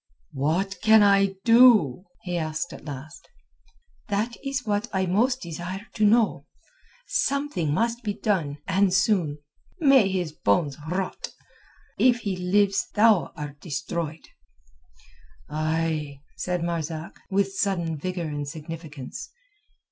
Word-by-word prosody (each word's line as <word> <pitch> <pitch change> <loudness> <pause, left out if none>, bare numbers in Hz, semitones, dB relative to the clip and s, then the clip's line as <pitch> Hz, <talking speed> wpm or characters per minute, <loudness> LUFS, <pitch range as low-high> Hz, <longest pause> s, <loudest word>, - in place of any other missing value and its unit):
"What 180 +8 -1
can 220 -1 +6
I 195 -1 +4
do?" 225 - +6 0.2
he 180 -1 -3
asked 160 0 -3
at - - -11
last. 155 +4 -9 0.8
"That 215 +4 -1
is 275 -3 -3
what 210 +1 0
I 190 -1 0
most 245 +8 +1
desire 175 +4 -6
to 215 - -1
know. 220 +1 +3 0.6
Something 280 - 0
must 235 +8 0
be 210 -4 -3
done, 165 -9 -1
and 195 0 +3
soon. 185 -6 +2 0.4
May 275 - +5
his 180 -4 -2
bones 140 +2 +1
rot! 185 +2 -3 0.7
If 245 -2 +4
he 200 -3 -2
lives 195 +2 +1
thou 210 -4 +4
art 145 -2 -7
destroyed." 160 0 -4 1.2
"Ay," 155 -1 -1 0.2
said 180 -2 -2
Marzak, 165 -1 -4
with 195 0 +1
sudden 180 -5 -1
vigour 180 +3 -4
and 145 -2 -4
significance. 155 -3 -8
180 Hz, 120 wpm, -25 LUFS, 155-205 Hz, 1.2 s, can